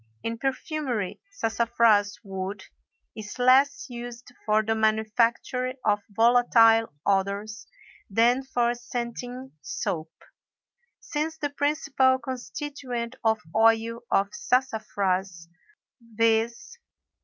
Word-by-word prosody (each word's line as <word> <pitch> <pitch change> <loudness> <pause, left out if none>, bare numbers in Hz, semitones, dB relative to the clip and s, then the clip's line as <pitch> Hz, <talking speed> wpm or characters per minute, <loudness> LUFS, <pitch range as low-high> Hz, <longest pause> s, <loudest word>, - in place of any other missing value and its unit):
In 230 0 -3
perfumery 270 - -3
sassafras 225 - +2
wood 190 0 -5 0.5
is 215 +1 -8
less 260 +3 +4
used 240 0 -8 0.2
for 215 0 +3
the 225 +1 0
manufacture 230 +4 +1
of 205 -1 +2
volatile 225 0 +5
odors 200 +2 -1 0.4
than 235 +5 +3
for 240 -3 0
scenting 245 +2 -6
soap. 160 -2 -3 0.9
Since 320 -5 -3
the 290 -2 -3
principal 285 -2 +2
constituent 255 -1 -5
of 220 -1 +2
oil 225 +1 +3
of 195 0 +2
sassafras, 200 -8 -1 0.5
viz. 230 - 0
230 Hz, 90 wpm, -26 LUFS, 215-255 Hz, 0.9 s, volatile